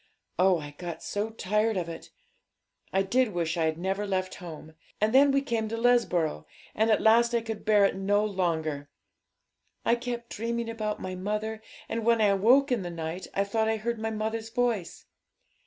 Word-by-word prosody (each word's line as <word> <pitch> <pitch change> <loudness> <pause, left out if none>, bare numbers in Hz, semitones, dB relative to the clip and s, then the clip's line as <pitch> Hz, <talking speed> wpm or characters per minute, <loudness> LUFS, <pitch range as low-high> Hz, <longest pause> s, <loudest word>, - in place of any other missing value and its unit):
Oh, 185 -1 +5
I 145 -2 -7
got 175 -2 -6
so 205 +2 -2
tired 215 0 0
of 175 -2 -2
it! 165 -1 -8 0.8
I 195 - +2
did 245 +2 +1
wish 170 -1 -1
I 165 -2 +1
had 160 0 0
never 195 +4 -2
left 185 -1 -1
home. 160 -2 -9 0.3
And 215 +2 +1
then 280 +2 +7
we 275 0 +2
came 230 -5 -1
to 230 - -3
Lesborough, 180 - +1 0.3
and 220 +1 +1
at 215 - +3
last 235 +2 +5
I 235 - +2
could 220 -2 -6
bear 210 -2 +5
it - - +1
no 205 +2 +1
longer. 160 -7 -2 1.0
I - - +4
kept 240 -1 -4
dreaming 230 +1 -2
about 215 -2 -3
my 185 - -5
mother, 210 +4 -3 0.3
and 230 0 -3
when 230 0 +3
I 205 -2 +4
woke 255 +8 +4
in 240 -4 +1
the 175 - -4
night 170 +2 -5
I 200 - +2
thought 220 +2 0
I 220 - +1
heard 235 +1 -3
my 225 0 -2
mother's 220 +1 -3
voice. 230 -6 -1
215 Hz, 190 wpm, -28 LUFS, 185-230 Hz, 1.0 s, then